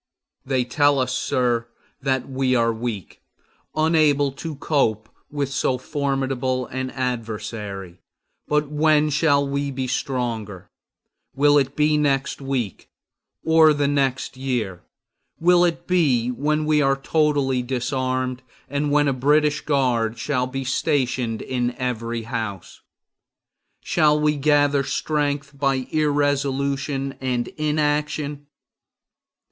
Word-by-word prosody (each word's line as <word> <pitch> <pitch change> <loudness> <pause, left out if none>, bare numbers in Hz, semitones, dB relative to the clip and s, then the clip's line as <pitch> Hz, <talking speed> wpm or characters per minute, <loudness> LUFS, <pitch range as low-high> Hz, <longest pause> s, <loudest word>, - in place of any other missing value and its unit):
They 130 -1 0
tell 145 +2 +3
us, 130 -1 0
sir, 120 -2 0 0.3
that 130 -2 0
we 130 -1 0
are 115 -1 +2
weak, 110 -5 -5 0.5
unable 155 -3 +3
to 155 +3 -6
cope 110 -7 0 0.2
with 140 -2 -2
so 130 -1 0
formidable 135 -2 -1
an 130 +1 -4
adversary; 105 -7 -5 0.5
but 150 0 +1
when 150 0 +2
shall 140 -1 +3
we 140 +1 -2
be 130 -1 -3
stronger? 115 -7 -3 0.6
Will 145 +1 +5
it 135 0 -2
be 150 0 +3
the - - +1
next 140 -1 0
week, 130 -7 -3 0.6
or 160 -1 +6
the 145 -1 +1
next 135 -3 0
year? 120 -9 -3 0.6
Will 175 +1 +5
it 170 -1 0
be 140 -10 +2
when 150 +4 0
we 150 -1 +3
are 135 -1 +2
totally 140 -3 +1
disarmed, 130 0 -2 0.3
and 145 +1 -1
when 145 0 +3
a 140 - +2
British 150 +3 +2
guard 120 -6 +1
shall 125 +1 -1
be 135 +1 -4
stationed 130 -4 0
in 125 -1 -2
every 115 -2 -3
house? 110 -6 -5 1.0
Shall 150 -2 +3
we 150 0 +2
gather 145 -1 +3
strength 145 0 -2
by 135 -2 +1
irresolution 140 -2 0
and 125 -2 -1
inaction? 150 -1 -1
135 Hz, 120 wpm, -22 LUFS, 125-145 Hz, 1.0 s, or